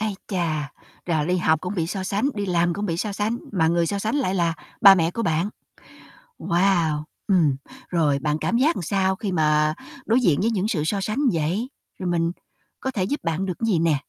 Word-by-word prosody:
Ái 215 Hz, -2 st, -1 dB
chà, 155 Hz, -6 st, -2 dB, 0.3 s
rồi 155 Hz, -3 st, 0 dB
đi 180 Hz, +1 st, +1 dB
học 160 Hz, -3 st, +2 dB
cũng 185 Hz, +3 st, -4 dB
bị 165 Hz, -3 st, -1 dB
so 190 Hz, +2 st, -4 dB
sánh, 205 Hz, +8 st, 0 dB
đi 205 Hz, -2 st, -3 dB
làm 175 Hz, -1 st, +1 dB
cũng 205 Hz, +1 st, -3 dB
bị 165 Hz, -3 st, -1 dB
so 205 Hz, +3 st, -2 dB
sánh, 215 Hz, +4 st, -1 dB
mà 165 Hz, -5 st, +2 dB
người 170 Hz, 0 st, +2 dB
so 200 Hz, +3 st, -2 dB
sánh 220 Hz, +7 st, -1 dB
lại 245 Hz, -10 st, 0 dB
là 170 Hz, -3 st, +1 dB, 0.3 s
ba 195 Hz, -1 st, +10 dB
mẹ 165 Hz, -2 st, +1 dB
của 230 Hz, -, -3 dB
bạn. 165 Hz, +1 st, +1 dB, 0.9 s
Wow, 170 Hz, -4 st, +1 dB, 0.2 s
ừm, 165 Hz, -8 st, +3 dB, 0.3 s
rồi 150 Hz, -5 st, +2 dB
bạn 150 Hz, +1 st, 0 dB
cảm 235 Hz, -, 0 dB
giác 300 Hz, +7 st, +3 dB
sao 190 Hz, +2 st, +1 dB
khi 200 Hz, -1 st, -4 dB
mà 155 Hz, -2 st, +2 dB, 0.3 s
đối 235 Hz, +3 st, +3 dB
diện 170 Hz, -, +3 dB
với 225 Hz, +3 st, +2 dB
những 205 Hz, -1 st, 0 dB
sự 160 Hz, -9 st, -1 dB
so 195 Hz, +5 st, -1 dB
sánh 215 Hz, +7 st, -2 dB
vậy, 170 Hz, +10 st, -1 dB, 0.3 s
rồi 185 Hz, -, -2 dB
mình 170 Hz, -1 st, +1 dB, 0.5 s
có 265 Hz, -, -3 dB
thể 205 Hz, -7 st, -1 dB
giúp 285 Hz, +11 st, -2 dB
bạn 165 Hz, +3 st, -1 dB
được 180 Hz, -3 st, -4 dB
cái 230 Hz, -, -2 dB
gì 185 Hz, -7 st, +2 dB
nè? 160 Hz, -3 st, +2 dB
180 Hz, 220 wpm, -23 LUFS, 165-205 Hz, 0.9 s, ba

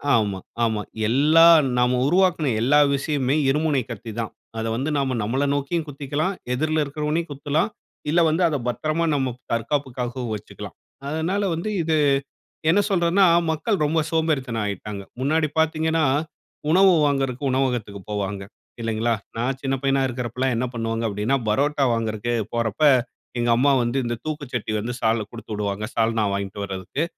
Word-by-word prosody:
ஆமா. 100 Hz, -4 st, 0 dB, 0.2 s
ஆமா. 110 Hz, -2 st, 0 dB, 0.3 s
எல்லா 150 Hz, +8 st, +6 dB, 0.3 s
நம்ம 125 Hz, 0 st, +2 dB
உருவாக்குன 175 Hz, -4 st, +2 dB
எல்லா 145 Hz, +5 st, +4 dB, 0.2 s
விஷயமுமே 140 Hz, -1 st, 0 dB
இருமுனை 150 Hz, -1 st, +2 dB
கத்தி 115 Hz, -2 st, -7 dB
தான். 115 Hz, -, -3 dB, 0.3 s
அத 110 Hz, -, -2 dB
வந்து 135 Hz, +6 st, -2 dB
நாம 135 Hz, -2 st, 0 dB
நம்மள 130 Hz, +6 st, 0 dB
நோக்கியும் 150 Hz, +3 st, -1 dB
குத்திக்கலாம். 145 Hz, +5 st, -2 dB, 0.2 s
எதிர்ல 155 Hz, +3 st, +1 dB
இருக்கிறவனையும் 150 Hz, +3 st, -2 dB
குத்தலாம். 145 Hz, +7 st, 0 dB, 0.4 s
இல்ல 170 Hz, -, +3 dB
வந்து 160 Hz, +4 st, 0 dB
அத 155 Hz, -, -1 dB
பத்திரமா 155 Hz, +6 st, 0 dB
நம்ம 130 Hz, -3 st, 0 dB, 0.2 s
தற்காப்புக்காகவும் 125 Hz, -1 st, -2 dB
வச்சுக்கலாம். 105 Hz, -, -9 dB, 0.3 s
அதனால 160 Hz, +7 st, -1 dB
வந்து 170 Hz, +6 st, -3 dB
இது 160 Hz, 0 st, +1 dB, 0.7 s
என்ன 190 Hz, +5 st, +5 dB
சொல்றதுனா 185 Hz, 0 st, +3 dB, 0.3 s
மக்கள் 195 Hz, +7 st, 0 dB
ரொம்ப 160 Hz, +2 st, +1 dB
சோம்பேறித்தனம் 135 Hz, -9 st, 0 dB
ஆயிட்டாங்க. 100 Hz, 0 st, -5 dB, 0.2 s
முன்னாடி 155 Hz, +4 st, +1 dB
பாத்தீங்கன்னா, 160 Hz, 0 st, +1 dB, 0.7 s
உணவு 185 Hz, +3 st, +6 dB
வாங்குறக்கு 135 Hz, -2 st, 0 dB
உணவகத்துக்கு 125 Hz, -6 st, -1 dB
போவாங்க, 100 Hz, -1 st, -3 dB, 0.4 s
இல்லைங்களா? 115 Hz, +1 st, 0 dB, 0.2 s
நான் 125 Hz, +3 st, -1 dB
சின்ன 135 Hz, -1 st, 0 dB
பையனா 135 Hz, 0 st, +2 dB
இருக்குறப்பலாம் 125 Hz, +1 st, -2 dB
என்ன 125 Hz, -, 0 dB
பண்ணுவாங்க 115 Hz, 0 st, -2 dB
அப்படினா, 105 Hz, +6 st, 0 dB
பரோட்டா 140 Hz, +5 st, +1 dB
வாங்குறதுக்கே 115 Hz, +1 st, -1 dB, 0.2 s
போறப்ப, 115 Hz, +4 st, -2 dB, 0.6 s
எங்க 120 Hz, 0 st, +1 dB
அம்மா 140 Hz, +3 st, +4 dB
வந்து 120 Hz, +3 st, -1 dB
இந்த 120 Hz, -, -1 dB
தூக்கு 155 Hz, -2 st, -4 dB
சட்டிய 110 Hz, -2 st, -2 dB
வந்து 120 Hz, +3 st, -3 dB
சால்ல 110 Hz, -1 st, +2 dB
குடுத்துவிடுவாங்க, 105 Hz, -3 st, -4 dB
சால்னா 115 Hz, -1 st, +1 dB
வாங்கிட்டு 100 Hz, 0 st, -4 dB
வரதுக்கு. 95 Hz, -, -3 dB
135 Hz, 140 wpm, -23 LUFS, 115-155 Hz, 0.7 s, எல்லா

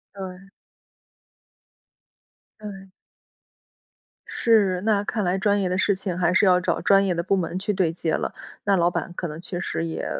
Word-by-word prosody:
对。 190 Hz, 0 st, -8 dB, 2.1 s
对。 195 Hz, -2 st, -9 dB, 1.4 s
是， 200 Hz, -6 st, +2 dB
那 205 Hz, -1 st, +2 dB
看 215 Hz, -1 st, -1 dB
来 180 Hz, +1 st, +1 dB
专 205 Hz, +1 st, +2 dB
业 185 Hz, -, 0 dB
的 185 Hz, -, 0 dB
事 200 Hz, 0 st, +2 dB
情 185 Hz, -2 st, -4 dB
还 175 Hz, -1 st, +2 dB
是 200 Hz, -, +4 dB
要 180 Hz, -1 st, +5 dB
找 170 Hz, -, -1 dB
专 195 Hz, 0 st, +4 dB
业 185 Hz, -, +1 dB
的 170 Hz, -, -1 dB
部 195 Hz, +2 st, +1 dB
门 175 Hz, 0 st, -2 dB
去 200 Hz, +2 st, -1 dB
对 180 Hz, -4 st, +1 dB
接 160 Hz, -2 st, -2 dB
了， -, -, -2 dB, 0.3 s
那 200 Hz, -, +4 dB
老 175 Hz, -1 st, +3 dB
板 175 Hz, -, -4 dB
可 175 Hz, -, -3 dB
能 150 Hz, +1 st, -7 dB
确 175 Hz, +1 st, -5 dB
实 165 Hz, -, -2 dB
也， 165 Hz, -, -4 dB
190 Hz, 190 characters per minute, -24 LUFS, 175-200 Hz, 2.1 s, 要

